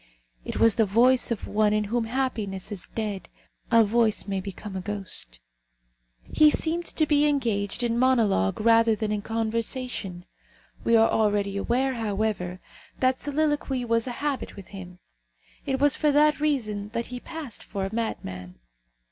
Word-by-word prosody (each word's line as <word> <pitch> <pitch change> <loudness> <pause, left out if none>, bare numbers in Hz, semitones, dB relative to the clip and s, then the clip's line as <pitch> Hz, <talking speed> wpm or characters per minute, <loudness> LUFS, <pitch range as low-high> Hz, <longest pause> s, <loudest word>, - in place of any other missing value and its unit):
It - - -5
was 230 -2 +5
the 225 - +4
voice 245 +5 +4
of 235 -3 -3
one 210 0 +2
in 215 0 +1
whom 230 +3 -1
happiness 225 -6 -3
is 195 -4 -3
dead. 205 -6 -4 0.4
A 230 -1 +6
voice 220 0 +1
may 195 -1 -2
become 195 +1 -8
a 190 - -3
ghost. 185 - -7 0.8
He 305 -1 +4
seemed 335 +3 0
to 310 - +1
be 295 0 +3
engaged 230 -6 0
in 235 0 0
monologue 225 - +2
rather 230 0 +4
than 215 -1 -2
in 210 -1 -1
conversation. 225 -3 -3 0.6
We 230 - +3
are 225 0 +5
already 205 -2 +1
aware, 250 +6 0
however, 205 -5 -2 0.4
that 255 0 +2
soliloquy 290 -3 -1
was 230 +1 +1
a - - -2
habit 285 -3 -2
with 195 -3 -11
him. 180 -3 -10 0.7
It 265 -1 0
was 290 0 +5
for 300 - +2
that 300 +1 +4
reason 215 -9 -1
that 235 -1 -2
he 250 - -4
passed 310 -5 -7
for 195 -1 -4
a 195 - -6
madman. 95 - -4
225 Hz, 160 wpm, -26 LUFS, 200-255 Hz, 0.8 s, A